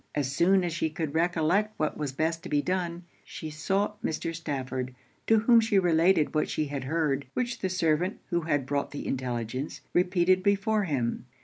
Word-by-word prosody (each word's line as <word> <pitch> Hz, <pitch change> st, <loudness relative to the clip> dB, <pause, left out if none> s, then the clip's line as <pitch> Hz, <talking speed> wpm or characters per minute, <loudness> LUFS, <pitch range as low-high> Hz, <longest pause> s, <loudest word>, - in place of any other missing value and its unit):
As 140 Hz, -2 st, 0 dB
soon 185 Hz, +3 st, +4 dB
as 175 Hz, -2 st, -2 dB
she 160 Hz, -1 st, 0 dB
could 155 Hz, -1 st, -4 dB
recollect 175 Hz, +5 st, +1 dB
what 155 Hz, -, -1 dB
was 150 Hz, -3 st, -3 dB
best 160 Hz, +4 st, -1 dB
to -, -, -8 dB
be 145 Hz, -, +2 dB
done, 175 Hz, -1 st, -2 dB, 0.2 s
she 155 Hz, -, -7 dB
sought 195 Hz, +7 st, -1 dB
Mr. 165 Hz, +1 st, -2 dB
Stafford, 130 Hz, -5 st, -4 dB, 0.3 s
to 225 Hz, -, +5 dB
whom 235 Hz, +1 st, +6 dB
she 225 Hz, -2 st, +2 dB
related 170 Hz, -2 st, +3 dB
what 155 Hz, -, +1 dB
she 155 Hz, -, -1 dB
had 140 Hz, -3 st, -4 dB
heard, 145 Hz, -2 st, 0 dB
which 240 Hz, -1 st, -1 dB
the 190 Hz, -, -1 dB
servant 180 Hz, 0 st, +1 dB
who 170 Hz, 0 st, +1 dB
had 145 Hz, -4 st, 0 dB
brought 140 Hz, +1 st, -1 dB
the 145 Hz, -, -6 dB
intelligence 125 Hz, +1 st, -3 dB
repeated 180 Hz, +1 st, +3 dB
before 200 Hz, +2 st, +2 dB
him. 125 Hz, -6 st, -2 dB
165 Hz, 185 wpm, -28 LUFS, 145-185 Hz, 0.3 s, whom